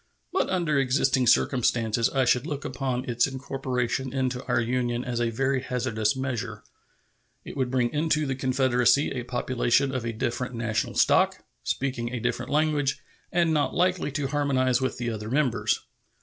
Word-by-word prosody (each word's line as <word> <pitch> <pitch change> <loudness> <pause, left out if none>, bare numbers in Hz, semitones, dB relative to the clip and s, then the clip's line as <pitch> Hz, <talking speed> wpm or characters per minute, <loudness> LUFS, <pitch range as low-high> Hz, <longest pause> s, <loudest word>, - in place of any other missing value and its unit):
But 380 - +1
under 170 -6 +1
existing 130 -1 +2
circumstances 115 -2 +2
I 135 -2 +1
should 125 +3 +2
look 145 -3 -4
upon 130 -1 -2
its 120 0 +2
incorporation 130 -1 -2
into 130 -1 -1
our - - +2
Union 120 0 -1
as 120 -1 -2
a 120 - +1
very 130 +3 0
hazardous 120 -4 -1
measure. 120 -5 -4 0.8
It - - -8
would 130 -3 0
bring 125 -2 0
into 155 0 +1
the 135 - -1
Confederacy 130 0 +2
a 125 - -3
population 125 +2 0
of 130 -2 -2
a 115 - -2
different 120 +2 -3
national 115 -1 -2
stock, - - +3 0.2
speaking 125 -3 -2
a 125 - -3
different 120 +1 -2
language, 150 -2 +1 0.3
and 170 -2 +2
not 150 -2 +1
likely 180 -3 +1
to 145 - -1
harmonize 135 -3 +1
with 130 - -1
the 120 -2 -2
other 110 -1 -5
members. 125 -6 +1
130 Hz, 165 wpm, -26 LUFS, 120-135 Hz, 0.8 s, stock